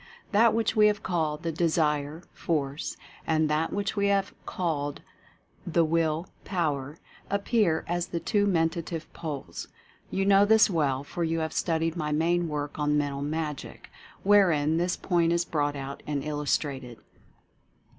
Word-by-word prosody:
That 225 +1 +5
which 225 0 +1
we 210 -1 +6
have 210 +1 0
called 160 -3 -1
the 165 - -1
Desire 155 -1 0
Force, 145 -3 -2 0.3
and 160 -1 +2
that 155 +2 +1
which 205 0 -2
we 200 -1 +2
have 200 -1 +1
called 145 -5 -2 0.6
the 170 -1 +3
Will 160 0 +1 0.2
Power, 150 -5 -2 0.3
appear 200 -4 +1
as 175 0 -1
the 170 - -3
Two 205 +2 +1
Mentative 165 -2 0
Poles. 150 -5 -6 0.4
You 195 0 0
know 200 0 +6
this 220 0 +5
well, 140 -5 +1
for 170 +4 -4
you 165 0 0
have 160 - -3
studied 165 -1 0
my 150 -3 -2
main 170 +3 +1
work 150 -1 -4
on 150 0 +2
"Mental 140 -1 -1
Magic," 150 0 -4 0.3
wherein 170 -7 +4
this 175 +1 0
point 170 -2 +1
is 170 0 +1
brought 145 -2 -1
out 140 0 -6
and 145 -2 -2
illustrated. 140 -4 -2
165 Hz, 150 wpm, -27 LUFS, 150-180 Hz, 0.6 s, we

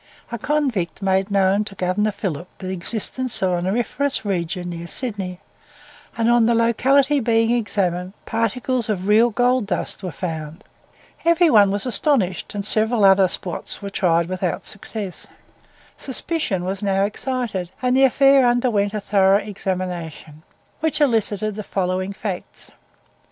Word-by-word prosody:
A 235 - -4
convict 235 - -1
made 190 +1 +1
known 200 +1 +2
to 200 - -9
Governor 185 +3 0
Phillip 180 -5 -4
the 185 0 -6
existence 220 +7 -3
of 185 - +2
an 175 0 -1
auriferous 240 +6 -1
region 175 -2 -2
near 170 0 -7
Sydney, 195 -6 -3 0.8
and 230 0 +1
on 240 -1 +4
the 235 - +3
locality 265 +5 +3
being 225 -1 +2
examined, 190 -6 -1
particles 230 +1 -1
of 190 -2 -2
real 220 +3 +5
gold 245 0 +1
dust 190 - -3
were 185 -3 -5
found. 155 0 -6 0.6
Every 335 0 +4
one 205 -4 +6
was 200 +3 +1
astonished, 230 - 0
and 200 -1 -3
several 220 0 +4
other 190 0 +6
spots 180 +2 -2
were 200 - -5
tried 170 -4 +2
without 180 -3 -3
success. 200 -2 -4 0.7
Suspicion 265 - -2
was 190 +1 -3
now 195 -1 +1
excited, 215 -5 -3
and 250 0 +1
the 270 - +4
affair 275 +1 +5
underwent 235 -4 +1
a 210 - -2
thorough 195 -1 +3
examination, 180 -7 -5 0.4
which 315 0 +2
elicited 215 -6 +2
the 215 - -6
following 185 -1 -2
facts. 195 -2 -7
205 Hz, 145 wpm, -21 LUFS, 185-240 Hz, 0.8 s, one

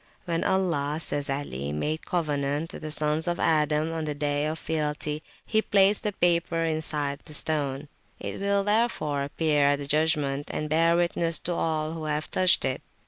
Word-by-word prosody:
When 165 -2 -1
Allah, 160 -6 +1
says 145 -3 0
Ali, 75 - -3
made 150 - -3
covenant 150 -2 -1
with - - -8
the 155 - -5
Sons 150 +1 +1
of 175 0 -1
Adam 155 0 +2
on 160 -1 -3
the 150 -1 -3
Day 145 0 0
of 155 +1 -3
Fealty, 150 -1 -2 0.2
he 220 -1 +2
placed 200 -1 +3
the 210 - -1
paper 170 -2 +1
inside 150 -3 -1
the 150 - -9
stone; 145 -2 -1 0.3
it - - -5
will, 200 0 +1
therefore, 205 -10 +1
appear 145 0 +1
at 145 0 +4
the 140 - -5
judgment, 145 -1 0
and 150 - -3
bear 165 +2 +4
witness 170 -1 +2
to 175 - -2
all 155 -2 -1
who 160 -1 -5
have 150 0 -2
touched 185 -1 +3
it. 130 - -1
155 Hz, 180 wpm, -27 LUFS, 145-170 Hz, 0.3 s, at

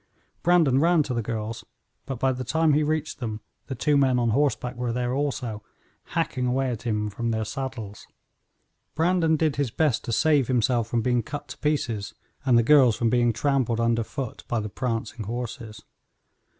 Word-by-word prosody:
Brandon 165 -7 +4
ran 165 0 +4
to 135 - -4
the 120 - 0
girls, 115 0 -4 0.4
but 135 -2 -3
by 130 +2 +2
the 130 0 -4
time 160 +4 +2
he 150 - +3
reached 155 +1 -1
them 110 -4 -4 0.3
the 135 - -4
two 145 +4 +1
men 130 -2 +3
on 120 -2 +1
horseback 130 -1 0
were 120 -1 -2
there 125 +1 -1
also, 130 -6 -2 0.5
hacking 135 -7 0
away 130 +1 0
at 115 - -5
him 105 -3 -1
from 115 +3 -3
their 110 -1 -1
saddles. 115 -3 -6 0.9
Brandon 165 0 +2
did 155 -2 0
his 140 -3 0
best 145 0 +1
to - - -3
save 145 +2 +3
himself 120 -2 +1
from 115 -1 -1
being 125 0 +2
cut 145 +6 -7
to - - -8
pieces 120 -9 -1 0.3
and 125 -2 +5
the 115 - +4
girls 130 -3 +6
from 115 0 0
being 120 -1 +3
trampled 125 -1 0
under 115 0 +2
foot 125 +2 -6
by 120 - 0
the 105 0 -4
prancing 115 -2 -3
horses. 115 -1 -6
125 Hz, 185 wpm, -25 LUFS, 115-140 Hz, 0.9 s, girls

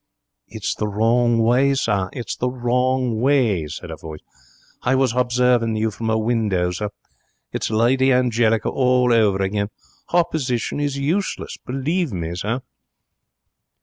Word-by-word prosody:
'It's - - -3
the 105 - -3
wrong 115 +3 +2
way, 130 +4 +3
sir; 100 -7 0
it's 120 - -5
the 125 - -1
wrong 125 -1 0
way,' 120 - +2
said - - -8
a - - -5
voice. 80 -1 -9 0.6
'I 130 - +2
was 130 -2 +2
hobserving 125 -2 +2
you 110 0 0
from 110 +2 -4
a 110 - +2
window, 110 -6 0
sir. 105 +4 -3 0.6
It's - - -2
Lady 125 +4 +3
Angelica 120 -3 +2
over 120 -6 +3
again. 100 +1 -1 0.4
Hopposition 145 -8 0
is 145 -1 -1
useless, 165 +9 -2
believe 145 +5 -1
me, 85 -2 -3
sir.' 105 +8 -2
120 Hz, 135 wpm, -21 LUFS, 110-130 Hz, 0.6 s, way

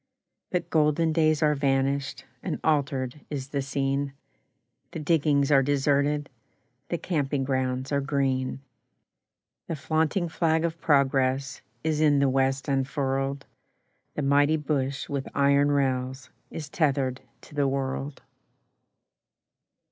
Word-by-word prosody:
But 175 -2 -2
golden 155 +1 +2
days 155 -1 +2
are 150 0 +4
vanished, 135 0 0 0.2
And - - -3
altered 140 -3 0
is 135 -2 -5
the 140 -1 -1
scene; 140 0 -1 0.8
The - - -4
diggings 150 -2 +2
are 135 -2 +6
deserted, 145 +1 +1 0.6
The 170 - -1
camping 145 -6 -1
grounds 130 0 -1
are 140 -1 +1
green; 135 -2 -1 1.1
The 165 - -2
flaunting 160 +4 0
flag 160 0 +1
of 165 0 -4
progress 135 -2 +2 0.2
Is 155 -1 0
in 150 -2 +4
the 140 -1 +3
West 135 +1 +1
unfurled, 135 0 -1 0.7
The 150 - -2
mighty 145 +3 +4
bush 140 -3 -2
with 140 -2 -3
iron 140 +1 +4
rails 130 -2 -1 0.2
Is 155 -3 -6
tethered 135 -4 0 0.2
to - - -16
the 145 -1 +1
world. 135 +1 -3
140 Hz, 120 wpm, -26 LUFS, 135-150 Hz, 1.1 s, are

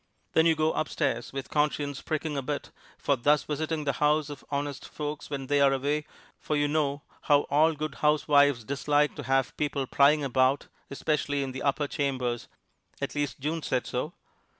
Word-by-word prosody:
Then 160 +1 +5
you 165 - +4
go 155 0 +1
upstairs, 140 -6 -1
with 135 -1 -6
conscience 145 -2 0
pricking 155 -1 -2
a 140 - -1
bit 145 +2 -4 0.3
for 140 - +1
thus 145 +2 +3
visiting 155 +1 -2
the 140 -2 0
house 150 0 +2
of 145 - -9
honest 145 -1 -3
folks 150 -1 -5
when 140 -2 -4
they 145 +1 +2
are 140 -1 +6
away, 145 +3 -1 0.3
for 150 - -2
you 145 0 +2
know 145 -1 0 0.3
how 145 -1 +6
all 155 +3 +4
good 155 +1 -4
housewives 145 -4 +4
dislike 145 +4 +1
to - - -4
have 135 0 0
people 145 -2 -1
prying 145 +3 +4
about, 130 +1 +2 0.2
especially 145 0 -1
in 135 - -4
the 130 - -6
upper 145 +1 +1
chambers 130 -5 -2 0.5
at - - -3
least 145 -1 -2
June 155 +4 -2
said 130 -4 -1
so! 150 +7 -3
145 Hz, 180 wpm, -28 LUFS, 135-150 Hz, 0.5 s, are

